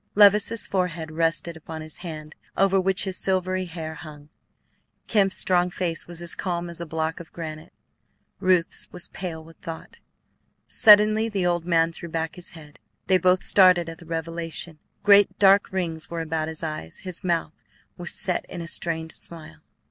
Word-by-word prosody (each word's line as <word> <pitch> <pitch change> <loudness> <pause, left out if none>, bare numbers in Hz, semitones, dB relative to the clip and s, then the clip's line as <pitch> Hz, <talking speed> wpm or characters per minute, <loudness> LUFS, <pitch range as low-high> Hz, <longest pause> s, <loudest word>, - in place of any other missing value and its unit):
Levice's 210 +2 +5
forehead 175 -4 -2
rested 165 +1 0
upon 160 0 -8
his 155 -1 -5
hand 155 -3 -8 0.2
over 195 0 +3
which 190 0 +1
his 190 -2 -1
silvery 185 0 0
hair 160 -2 -6
hung. 150 -3 -12 0.8
Kemp's 195 -3 +2
strong 180 -1 +2
face 175 -2 -2
was 175 0 -6
as 170 - -1
calm 175 -2 -3
as 170 - -7
a 170 - -5
block 160 +1 -2
of 170 - -11
granite; 160 0 -8 0.7
Ruth's 185 -3 +1
was 180 -1 -8
pale 165 -4 -6
with 165 +1 -16
thought. 165 -2 -9 0.7
Suddenly 215 +1 +6
the 195 -4 -1
old 175 -1 0
man 165 -1 +2
threw 170 +1 -8
back 160 0 -3
his 180 -1 -4
head. 150 -3 -13 0.3
They 185 -1 +3
both 180 +1 +3
started 180 -3 +5
at 165 0 -9
the 170 - -14
revelation: 165 0 -3 0.2
great 205 0 +5
dark 200 0 +5
rings 170 -4 -3
were 170 -1 -3
about 160 -1 -2
his 160 0 -6
eyes; 155 - -5
his 185 -2 -6
mouth 170 -3 -1 0.4
was 175 -1 -6
set 180 - -1
in - - -6
a - - -7
strained 160 -1 -1
smile. 155 - -5
170 Hz, 170 wpm, -24 LUFS, 160-185 Hz, 0.8 s, Suddenly